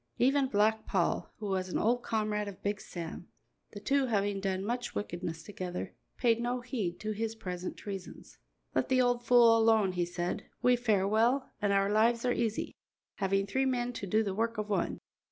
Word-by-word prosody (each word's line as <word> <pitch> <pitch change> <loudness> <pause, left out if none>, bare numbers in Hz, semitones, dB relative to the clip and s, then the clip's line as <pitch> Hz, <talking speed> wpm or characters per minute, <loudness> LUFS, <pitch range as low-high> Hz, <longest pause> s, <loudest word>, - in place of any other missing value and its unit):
Even 270 +2 +3
Black 220 -1 +2
Paul, 185 -4 0
who 215 - -7
was 190 -2 -1
an - - -1
old 240 +3 +2
comrade 215 -2 -1
of 200 -2 -9
Big 205 0 -1
Sam 170 0 -7 0.5
the 205 - -6
two 270 +5 +1
having 205 -3 0
done 190 0 -2
much 245 +2 -3
wickedness 175 -4 -4
together 180 -1 -5 0.2
paid 235 -2 +2
no 245 +1 -1
heed 225 -9 -3
to 215 - -2
his 225 +1 -3
present 180 -4 -5
treasons. 195 -3 -8 0.3
"Let - - 0
the 260 -1 +3
old 245 -1 +2
fool 235 -1 +6
alone," 225 -3 +4
he 180 -1 0
said; 175 +4 -3 0.2
"we 250 0 +5
fare 215 -5 +1
well, 235 +6 +2
and 205 -1 +2
our 195 0 +2
lives 230 +3 +3
are 245 - +3
easy, 225 -2 -1 0.4
having 195 0 +1
three 265 +7 0
men 245 -1 -1
to 200 - -5
do 215 +4 +2
the 200 -3 -2
work 230 +3 -1
of 210 0 -3
one. 190 -4 0
215 Hz, 190 wpm, -31 LUFS, 195-240 Hz, 0.5 s, fool